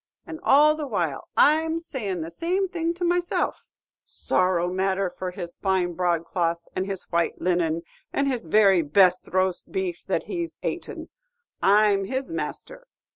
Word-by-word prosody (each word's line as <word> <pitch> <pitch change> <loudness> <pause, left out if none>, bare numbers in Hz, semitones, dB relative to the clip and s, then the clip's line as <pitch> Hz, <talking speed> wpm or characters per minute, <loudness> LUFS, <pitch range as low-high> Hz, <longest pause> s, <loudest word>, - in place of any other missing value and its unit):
And 315 - -8
all 300 +2 +5
the 305 -2 -5
while, 170 - -2
I'm 320 +2 +4
saying 215 - -4
the 165 +1 -6
same 365 - -1
thing 340 -1 -2
to 355 - -5
myself, 350 0 -1 0.4
'Sorrow 180 -1 0
matter 190 0 0
for 185 0 -5
his 175 -1 -7
fine 190 -3 0
broadcloth, 170 -1 0 0.2
and 185 +1 -1
his 195 -2 -4
white 170 -1 0
linen, 170 -2 0 0.3
and 280 - 0
his 250 -8 -1
very 195 0 +5
best 180 +4 +3
roast 185 -1 0
beef 370 -3 -3
that - - 0
he's 340 -3 -5
atin', - - -5 0.5
I 210 +2 +5
'm 195 0 -1
his 265 +7 -4
master! - - -5
195 Hz, 155 wpm, -25 LUFS, -, 0.5 s, all